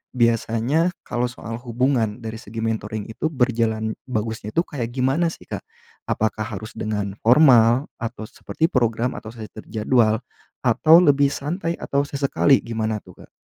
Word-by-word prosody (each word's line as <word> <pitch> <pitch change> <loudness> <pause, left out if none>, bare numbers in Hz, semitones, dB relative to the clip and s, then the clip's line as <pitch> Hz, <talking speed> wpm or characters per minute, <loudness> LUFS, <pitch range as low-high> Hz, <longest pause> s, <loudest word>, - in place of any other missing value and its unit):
biasanya 120 +7 +2 0.2
kalau 120 - -1
soal 115 -2 -7
hubungan 120 -2 0
dari 110 0 -5
segi 115 +2 -8
mentoring 110 -2 -3
itu 115 +8 -3
berjalan 115 -5 0
bagusnya 110 -2 -3
tuh 170 - +2
kayak 120 -5 -4
gimana 135 +7 +1
sih - - -13
Kak? - - -5 0.5
Apakah 110 0 0
harus 110 +3 -9
dengan 105 -2 -3
formal 120 -1 +6
atau 115 -1 -5
seperti 160 +6 -2
program, 120 -1 +1
atau 110 - -8
sudah 110 -2 -8
terjadwal, 110 0 +1 0.4
atau 160 +2 +6
lebih 140 -2 +4
santai, 165 +4 -3
atau 140 0 0
sesekali, 140 0 +2
gimana 110 -1 -2
tuh - - -15
Kak? - - -35
115 Hz, 145 wpm, -22 LUFS, 110-135 Hz, 0.5 s, formal